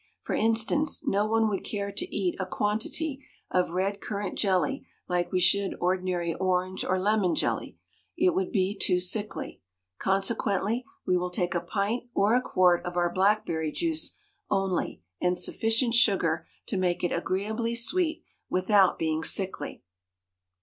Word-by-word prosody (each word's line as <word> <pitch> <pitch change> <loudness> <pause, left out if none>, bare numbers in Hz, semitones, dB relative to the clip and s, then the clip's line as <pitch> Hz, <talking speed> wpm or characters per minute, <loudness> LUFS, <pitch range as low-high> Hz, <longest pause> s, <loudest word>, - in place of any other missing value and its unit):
For - - -3
instance, 225 +7 +1
no 205 +2 +2
one 225 0 +2
would 200 -3 -2
care 200 -1 -3
to 200 - -4
eat 185 -3 0
a 185 - -2
quantity 245 - -2 0.3
of 180 -2 +2
red 195 +3 -1
currant 205 -1 -3
jelly 210 +8 0 0.2
like 175 -1 0
we 185 - +2
should 195 +2 +3
ordinary 180 -2 0
orange 185 +1 0
or 185 0 0
lemon 200 -2 +2
jelly - - -2 0.4
it 360 +1 +3
would 375 0 -1
be 195 -2 +1
too 185 -2 +2
sickly; 205 +4 -3 0.4
consequently 200 +3 0 0.2
we 180 - +3
will 180 0 -1
take 180 0 -1
a 175 - 0
pint 210 +7 -2
or 205 +3 +3
a 250 - +4
quart 180 -6 +3
of 175 0 -5
our 175 -1 +1
blackberry 185 -5 +1
juice 320 - -1 0.3
only 190 - -1 0.2
and 180 0 +2
sufficient 225 +2 +1
sugar 235 - +3 0.2
to 200 - -2
make 180 -1 0
it 175 - +1
agreeably 215 +7 -1
sweet 320 +7 +1 0.3
without 185 +1 +4
being 160 -1 -1
sickly. 185 - -1
195 Hz, 150 wpm, -28 LUFS, 180-225 Hz, 0.4 s, a